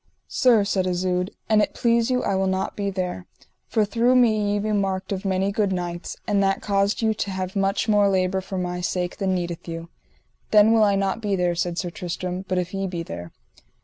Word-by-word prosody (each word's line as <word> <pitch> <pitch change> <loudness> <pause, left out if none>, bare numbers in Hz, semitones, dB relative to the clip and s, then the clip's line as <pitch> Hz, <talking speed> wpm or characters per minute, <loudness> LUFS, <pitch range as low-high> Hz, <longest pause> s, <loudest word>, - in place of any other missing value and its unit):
Sir, 240 -6 +4
said 190 -2 0
Isoud, 180 0 0 0.2
an 215 -1 +4
it - - -1
please 235 0 +2
you 250 -1 +1
I - - 0
will 190 0 +1
not 190 0 -1
be 200 -1 -2
there, 180 -1 -4 0.4
for 220 -2 +2
through 235 +5 +2
me 215 -4 +3
ye - - +1
be 215 +1 -1
marked 195 -2 -1
of 195 0 -3
many 190 +1 +1
good 200 -1 0
knights, 175 -1 -4
and 200 -1 +1
that 195 0 +2
caused 200 +2 0
you 220 0 +3
to 205 - -3
have 185 0 -4
much 195 +2 +1
more 205 -2 +4
labour 190 0 +1
for 190 0 -6
my 180 -1 -3
sake 180 0 -2
than 190 -2 0
needeth 175 -1 -4
you. 165 0 -6 0.6
Then 215 +1 +6
will 225 -1 +5
I 200 -1 +3
not 195 +3 -1
be 205 -2 0
there, 180 -1 +1
said 175 0 -2
Sir 180 -2 -2
Tristram, 180 +2 -4
but 185 - -1
if 180 +1 -2
ye 195 0 -2
be 175 -2 -4
there. 85 - -8
195 Hz, 220 wpm, -24 LUFS, 180-205 Hz, 0.6 s, Then